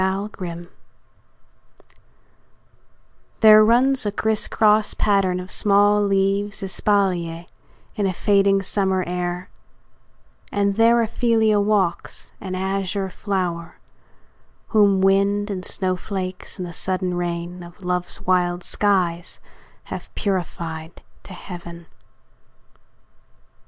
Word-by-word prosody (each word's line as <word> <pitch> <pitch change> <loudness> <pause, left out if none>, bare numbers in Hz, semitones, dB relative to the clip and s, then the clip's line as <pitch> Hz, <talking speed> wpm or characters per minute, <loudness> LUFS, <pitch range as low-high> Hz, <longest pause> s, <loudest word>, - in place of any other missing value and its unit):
OPHELIA 190 -3 -4 2.7
There 215 -1 +8
runs 250 +4 +3
a 205 - -1
crisscross 215 0 +2
pattern 195 -3 +1
of 180 +1 -7
small 205 0 +3
leaves 195 0 0
Espalier, 185 -4 0 0.5
in 205 -2 0
a - - 0
fading 195 +1 +2
summer 190 -1 0
air, 180 0 -4 1.0
And 200 -1 0
there 230 +1 +4
Ophelia 220 -2 +2
walks, 200 -4 -1
an 185 -1 -5
azure 190 0 -2
flower, 180 -5 -3 0.9
Whom 200 -3 +3
wind, 200 +2 +2
and 185 -2 -4
snowflakes, 185 0 -3
and 180 - -5
the 170 - -9
sudden 185 +1 0
rain 175 0 -4
Of 175 +3 -13
love's 180 0 -2
wild 180 -1 0
skies 180 -4 0 0.4
have - - -8
purified 170 -4 -4 0.2
to 190 - -10
heaven. 170 -2 -9
195 Hz, 95 wpm, -22 LUFS, 180-205 Hz, 2.7 s, There